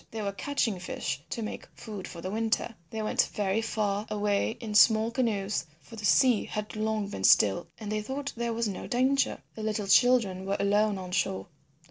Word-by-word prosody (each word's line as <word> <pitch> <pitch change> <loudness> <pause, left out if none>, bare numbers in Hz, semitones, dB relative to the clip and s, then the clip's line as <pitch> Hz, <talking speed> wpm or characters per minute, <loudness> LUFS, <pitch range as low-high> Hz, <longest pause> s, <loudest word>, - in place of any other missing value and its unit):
They 220 -1 -5
were 200 - -1
catching 225 -3 -1
fish 145 -6 -4
to 230 - -3
make 215 - -6
food 210 -4 -7
for 170 - -9
the 185 - -4
winter. 225 +2 0 0.2
They 220 -1 -4
went 215 - +1
very 205 +1 +1
far 210 -2 -1
away 210 +1 0
in 225 -3 -5
small 220 +2 +5
canoes, 210 -8 -1
for 230 - -13
the 210 -2 -5
sea 245 +1 +4
had 210 0 -5
long 215 -1 -1
been 95 - -6
still 100 0 +5
and 215 -2 -5
they 215 0 -1
thought 275 +5 -4
there 235 0 -2
was 230 0 -1
no 200 - -5
danger. 265 +2 +1
The 220 - -8
little 215 -1 -1
children 195 -3 +3
were 200 - 0
alone 205 +1 +2
on 185 -1 -7
shore. 190 0 -1
215 Hz, 195 wpm, -28 LUFS, 200-225 Hz, 0.2 s, small